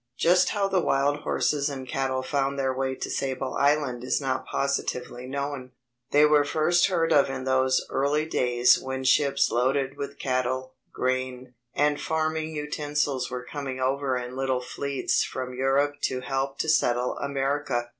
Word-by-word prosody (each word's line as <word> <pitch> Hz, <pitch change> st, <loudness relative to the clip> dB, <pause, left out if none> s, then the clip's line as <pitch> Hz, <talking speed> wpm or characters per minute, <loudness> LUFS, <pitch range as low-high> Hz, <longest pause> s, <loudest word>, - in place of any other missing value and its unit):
Just 180 Hz, +2 st, +4 dB
how 200 Hz, -2 st, 0 dB
the 190 Hz, -1 st, +1 dB
wild 145 Hz, -3 st, +1 dB
horses 145 Hz, -1 st, 0 dB
and 135 Hz, -2 st, -6 dB
cattle 130 Hz, 0 st, -1 dB
found 140 Hz, 0 st, -1 dB
their 135 Hz, -1 st, 0 dB
way 130 Hz, 0 st, -2 dB
to -, -, -4 dB
Sable 130 Hz, -1 st, -2 dB
Island 140 Hz, -4 st, +1 dB
is 125 Hz, -, 0 dB
not 130 Hz, -2 st, -2 dB
positively 125 Hz, -2 st, -2 dB
known. 140 Hz, -2 st, -4 dB, 0.4 s
They 145 Hz, +1 st, +5 dB
were 150 Hz, -1 st, +5 dB
first 155 Hz, +4 st, +2 dB
heard 170 Hz, -4 st, +1 dB
of 140 Hz, -1 st, +4 dB
in 130 Hz, -1 st, -4 dB
those 130 Hz, 0 st, +2 dB
early 145 Hz, +3 st, 0 dB
days 125 Hz, -5 st, +3 dB
when 130 Hz, 0 st, -4 dB
ships 140 Hz, +1 st, +3 dB
loaded 135 Hz, +2 st, 0 dB
with 140 Hz, 0 st, -6 dB
cattle, 130 Hz, 0 st, -1 dB, 0.2 s
grain, 130 Hz, 0 st, -2 dB, 0.2 s
and 145 Hz, 0 st, +2 dB
farming 160 Hz, 0 st, -1 dB
utensils 150 Hz, -3 st, -2 dB
were 125 Hz, 0 st, -5 dB
coming 135 Hz, -2 st, -5 dB
over 135 Hz, 0 st, 0 dB
in 125 Hz, 0 st, -6 dB
little 130 Hz, -1 st, 0 dB
fleets 140 Hz, +2 st, -1 dB
from 130 Hz, -1 st, -5 dB
Europe 140 Hz, +3 st, +1 dB
to 130 Hz, -1 st, -2 dB
help 135 Hz, +1 st, -2 dB
to -, -, -3 dB
settle 125 Hz, -5 st, +2 dB
America. 140 Hz, -3 st, -1 dB
135 Hz, 160 wpm, -26 LUFS, 130-145 Hz, 0.4 s, They